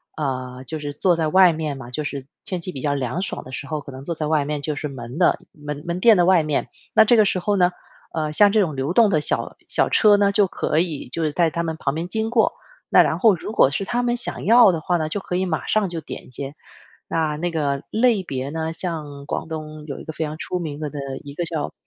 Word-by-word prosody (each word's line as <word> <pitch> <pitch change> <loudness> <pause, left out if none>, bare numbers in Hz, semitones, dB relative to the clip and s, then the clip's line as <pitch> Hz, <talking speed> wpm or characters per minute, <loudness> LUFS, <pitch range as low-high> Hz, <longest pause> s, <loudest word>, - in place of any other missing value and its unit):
呃， 130 -3 -4
就 160 +2 -5
是 145 -1 -5
坐 175 +3 +2
在 160 -1 +1
外 185 +2 +6
面 155 -3 -3
嘛 130 -3 -9
就 150 +4 -3
是 140 -2 -5 0.2
天 185 -2 -3
气 185 - -4
比 135 - -7
较 145 -1 0
凉 135 +5 -2
爽 195 - -4
的 130 - -11
时 140 +2 -6
候， 150 0 -3
可 140 - -10
能 130 +1 -10
坐 170 - -2
在 155 -1 -2
外 150 -2 +2
面， 150 0 -3
就 150 0 -3
是 150 - -3
门 125 -1 -8
的 175 - +4
门 150 -1 -7
门 170 +1 -2
店 225 +2 +7
的 175 - +4
外 185 -2 +5
面。 150 -2 -1 0.2
那 220 - +7
这 240 - +5
个 215 - +7
时 190 - +1
候 205 +3 0
呢， 180 -1 +3 0.4
呃， 155 -1 -2
像 205 +5 +6
这 215 - +3
种 165 -7 +1
流 135 +4 -1
动 225 -1 +5
的 155 -5 +2
小 - - -1
小 - - +2
车 215 - +5
儿 - - +6
呢， 200 0 +3
就 205 -1 +4
可 155 - 0
以 165 -6 -2
就 165 - -2
是 155 - +1
在 170 +2 +2
他 170 +1 -2
们 160 -1 -3
旁 140 -2 -1
边 165 +2 -3
经 220 +4 -2
过。 230 -2 +3 0.4
那 - - +7
然 - - -1
后 220 -5 +5
如 195 +5 -7
果 140 - +5
是 195 - -2
他 240 +4 -1
们 240 0 +1
想 240 - -2
要 230 -2 +7
的 160 - -3
话 175 +3 +1
呢， 155 -2 -1
就 195 +6 -3
可 180 - -4
以 190 - 0
马 180 - -2
上 215 -2 +2
就 170 -2 -4
点 - - -9
一 - - -16
些， 135 +3 -7 0.5
那 155 -2 0
那 175 +3 -2
个 145 -4 -1
类 225 -3 +3
别 135 -6 -4
呢 160 +1 -3
像 150 -5 -5
广 - - -3
东 155 -1 -7
有 140 -3 -6
一 - - -9
个 160 - -6
非 160 - -3
常 155 0 -5
出 180 +1 -3
名 150 -4 -5
的 155 -1 -3 0.4
一 140 0 -9
个 175 - -2
叫 160 -3 -3
160 Hz, 295 characters per minute, -22 LUFS, 145-185 Hz, 0.5 s, 店